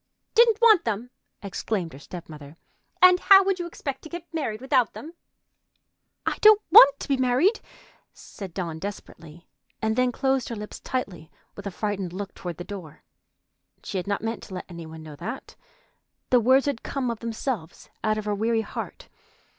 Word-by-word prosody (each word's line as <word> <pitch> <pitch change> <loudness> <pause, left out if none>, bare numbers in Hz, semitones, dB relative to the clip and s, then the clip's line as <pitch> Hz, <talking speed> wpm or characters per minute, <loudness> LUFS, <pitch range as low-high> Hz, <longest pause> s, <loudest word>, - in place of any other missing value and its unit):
"Didn't 465 -2 +5
want 435 -6 +6
them!" 230 +2 -3 0.3
exclaimed 195 -3 -3
her 135 - -11
step 170 +3 -9
mother. 150 0 -12 0.5
"And 365 0 +8
how 390 +1 +7
would 385 -1 0
you 350 - -3
expect 285 -5 -6
to 315 - -11
get 345 0 -9
married 270 -10 -2
without 260 -3 +1
them?" 320 +3 -9 1.1
"I - - -1
don't 430 -1 +8
want 280 -8 +9
to - - -6
be 275 - +1
married!" 260 - +2 0.5
said 195 -3 -10
Dawn 165 -2 -4
desperately, 170 -3 -9 0.3
and 220 0 0
then 250 0 +2
closed 265 0 0
her 235 - -4
lips 210 0 -8
tightly, 185 - -4 0.3
with 200 0 -7
a - - -1
frightened 195 -2 -3
look 195 +1 -6
toward 175 -3 -7
the 175 - -6
door. 180 -6 -9 0.8
She - - -4
had 180 - -6
not 200 +1 -2
meant 225 0 -3
to 190 - -9
let 180 - -6
any 170 -2 -9
one 160 0 -10
know 155 -1 -10
that. 225 - -7 0.8
The 250 - +6
words 260 +4 +4
had 285 -5 -2
come 260 -3 -2
of 230 - -6
themselves 225 - -5
out 215 0 +1
of 215 - -4
her 210 - 0
weary 225 +2 +1
heart. - - -7
220 Hz, 185 wpm, -25 LUFS, 185-270 Hz, 1.1 s, want